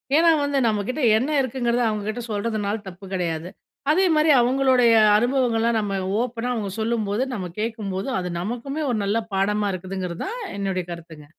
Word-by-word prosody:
ஏன்னா 335 Hz, +2 st, +6 dB
வந்து 285 Hz, -1 st, 0 dB
நம்ம 215 Hz, -2 st, +1 dB
கிட்ட 300 Hz, +4 st, -2 dB, 0.2 s
என்ன 255 Hz, +6 st, -1 dB
இருக்குங்கிறத 245 Hz, -2 st, 0 dB
அவுங்க 210 Hz, -1 st, -3 dB
கிட்ட 240 Hz, +3 st, -3 dB
சொல்றதுனால 210 Hz, 0 st, -2 dB
தப்பு 185 Hz, +1 st, -10 dB
கிடையாது. 170 Hz, -2 st, -2 dB, 0.4 s
அதேமாதிரி 320 Hz, -2 st, +3 dB
அவங்களுடைய 255 Hz, -1 st, +4 dB, 0.2 s
அனுபவங்கள்லாம் 235 Hz, -1 st, +1 dB
நம்ம 200 Hz, -2 st, -2 dB, 0.2 s
ஓப்பனா 245 Hz, 0 st, -2 dB
அவுங்க 210 Hz, -5 st, -3 dB
சொல்லும்போது, 220 Hz, 0 st, 0 dB
நம்ம 185 Hz, -6 st, -4 dB
கேட்கும்போது, 210 Hz, -3 st, -3 dB
அது 180 Hz, -1 st, -4 dB
நமக்குமே 245 Hz, -, -4 dB
ஒரு 235 Hz, -, 0 dB
நல்ல 205 Hz, +3 st, +1 dB, 0.2 s
பாடமா 205 Hz, +2 st, +1 dB
இருக்குங்கிறது 185 Hz, -1 st, -5 dB
தான் 465 Hz, +5 st, -5 dB, 0.2 s
என்னுடைய 190 Hz, -3 st, -2 dB
கருத்துங்க. 165 Hz, -3 st, -10 dB
220 Hz, 155 wpm, -23 LUFS, 195-250 Hz, 0.4 s, ஏன்னா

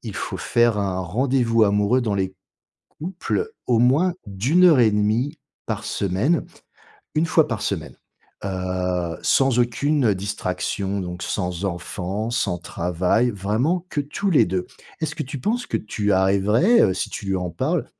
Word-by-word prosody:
faut -, -, -4 dB
faire 120 Hz, -2 st, +2 dB
un 95 Hz, -2 st, -1 dB
rendez-vous 115 Hz, +4 st, +2 dB
amoureux, 105 Hz, +4 st, +3 dB
dans 110 Hz, -4 st, -1 dB
les 95 Hz, -1 st, -2 dB, 0.6 s
couples, 190 Hz, -, -2 dB, 0.2 s
au 120 Hz, -2 st, +3 dB
moins 145 Hz, +10 st, +3 dB
d'1h30 120 Hz, -, +3 dB, 0.3 s
par 110 Hz, -1 st, -3 dB
semaine. 105 Hz, -, 0 dB, 0.7 s
1 155 Hz, +2 st, +2 dB
fois 160 Hz, -1 st, +3 dB
par 115 Hz, -3 st, -3 dB
semaine, -, -, -3 dB, 0.5 s
heu, 90 Hz, -2 st, -2 dB
sans 135 Hz, -3 st, +3 dB
aucune 120 Hz, 0 st, +2 dB
distraction, 100 Hz, 0 st, -3 dB
donc 90 Hz, -1 st, -6 dB
sans 90 Hz, -1 st, -3 dB
enfant, 95 Hz, +3 st, -3 dB
sans 100 Hz, -8 st, 0 dB
travail. 90 Hz, +8 st, 0 dB
Vraiment 120 Hz, -, -1 dB
que 145 Hz, -, -1 dB
tous 150 Hz, +8 st, -2 dB
les 165 Hz, -, +5 dB
2. 90 Hz, 0 st, -2 dB, 0.3 s
Est-ce 155 Hz, -2 st, -2 dB
que 155 Hz, -, -2 dB
tu 140 Hz, +2 st, -6 dB
penses 235 Hz, -, -1 dB
que -, -, -1 dB
tu 105 Hz, -1 st, -2 dB
arriverais, 100 Hz, -, +4 dB
heu, 95 Hz, -, +3 dB
si -, -, -3 dB
tu 100 Hz, -, -6 dB
lui 95 Hz, -1 st, 0 dB
en 90 Hz, -1 st, -3 dB
parles, -, -, -1 dB
105 Hz, 145 wpm, -22 LUFS, 95-135 Hz, 0.7 s, les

